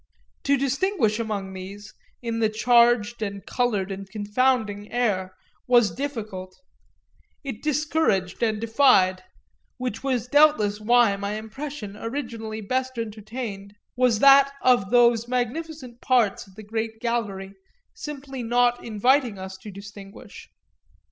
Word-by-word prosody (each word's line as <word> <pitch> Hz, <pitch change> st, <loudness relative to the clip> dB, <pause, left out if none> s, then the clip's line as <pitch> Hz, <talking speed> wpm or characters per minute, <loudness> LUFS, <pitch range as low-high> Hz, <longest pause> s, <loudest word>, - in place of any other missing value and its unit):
To 280 Hz, 0 st, +3 dB
distinguish 275 Hz, -, 0 dB
among 205 Hz, -4 st, -3 dB
these, 195 Hz, +2 st, -9 dB, 0.3 s
in 230 Hz, -1 st, -2 dB
the 220 Hz, -1 st, +2 dB
charged 235 Hz, 0 st, +3 dB
and 200 Hz, -2 st, -4 dB
coloured 210 Hz, -6 st, -1 dB
and 195 Hz, 0 st, -7 dB
confounding 210 Hz, 0 st, 0 dB
air, 195 Hz, -6 st, -1 dB, 0.3 s
was 240 Hz, -4 st, +4 dB
difficult 215 Hz, -9 st, -6 dB, 0.8 s
it 270 Hz, -6 st, -6 dB
discouraged 300 Hz, -, 0 dB
and 220 Hz, -2 st, +1 dB
defied; 220 Hz, -6 st, +3 dB, 0.6 s
which 250 Hz, -3 st, -4 dB
was 250 Hz, -3 st, -1 dB
doubtless 285 Hz, -8 st, +4 dB
why 235 Hz, -2 st, +4 dB
my 200 Hz, +1 st, -3 dB
impression 220 Hz, 0 st, -7 dB
originally 225 Hz, -2 st, -5 dB
best 255 Hz, +4 st, -2 dB
entertained 215 Hz, -2 st, -6 dB, 0.2 s
was 250 Hz, -3 st, +3 dB
that 275 Hz, +3 st, +7 dB
of 245 Hz, -6 st, +3 dB
those 235 Hz, -1 st, +4 dB
magnificent 255 Hz, +1 st, -4 dB
parts 235 Hz, -7 st, +1 dB
of 190 Hz, -, -19 dB
the 215 Hz, -, -10 dB
great 220 Hz, +1 st, -4 dB
gallery 205 Hz, -5 st, -3 dB, 0.4 s
simply 275 Hz, -3 st, -7 dB
not 240 Hz, +1 st, +1 dB
inviting 240 Hz, +1 st, +1 dB
us 190 Hz, 0 st, -7 dB
to 210 Hz, -, -11 dB
distinguish. 200 Hz, 0 st, -12 dB
230 Hz, 120 wpm, -24 LUFS, 205-255 Hz, 0.8 s, that